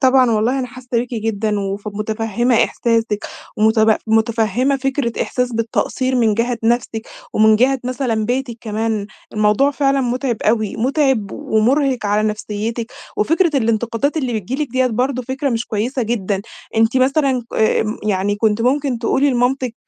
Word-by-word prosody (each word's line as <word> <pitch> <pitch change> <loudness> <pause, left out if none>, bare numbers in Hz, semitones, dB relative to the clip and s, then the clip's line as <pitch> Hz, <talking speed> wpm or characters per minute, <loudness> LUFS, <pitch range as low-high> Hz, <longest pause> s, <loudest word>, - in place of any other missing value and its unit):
طبعًا 260 -2 +4
والله 225 +4 +1
أنا 255 - -2
حاسّة 255 0 -13
بيكِ 240 +1 0
جدًا، 215 -1 -1
وف 200 +1 -4
متفهمة 220 +3 -1
إحساسِك 230 -3 -1 0.3
ومتب 220 0 +4
متفهمة 225 +3 +1
فكرة 270 -3 -1
إحساس 250 -1 -2
بالتقصير 235 +3 -1
من 225 -3 +3
جهة 235 +2 0
نفسِك، 230 -1 0 0.2
ومن 220 0 +5
جهة 260 +4 +3
مثلًا 245 -3 -1
بيتِك 245 +1 -2
كمان. 220 -1 -2 0.3
الموضوع 215 +6 +3
فعلًا 275 -1 +1
متعب 250 -1 -1
أوي، 215 -1 +1
متعب 260 -4 +1
ومرهق 255 +2 +1
على 210 +1 +2
نفسيتِك. 220 +3 -4 0.2
وفكرة 325 - +2
الانتقادات 230 +4 0
اللي 260 -6 -1
بتيجي 260 +10 -3
لكِ - - -15
ديّة 260 +1 +2
برضو 255 +2 -1
فكرة 265 +3 -2
مش 230 -1 -2
كويّسة 240 +5 -1
جدًا. 205 -4 -1 0.3
أنتِ 225 +3 +3
مثلًا 265 -1 +2
ك - - -8
آمم، 210 -2 0
كنتِ 220 -1 +2
ممكن 270 0 +1
تقولي 270 +4 +2
لمامتِك، 250 0 0
235 Hz, 150 wpm, -18 LUFS, 220-260 Hz, 0.3 s, ومن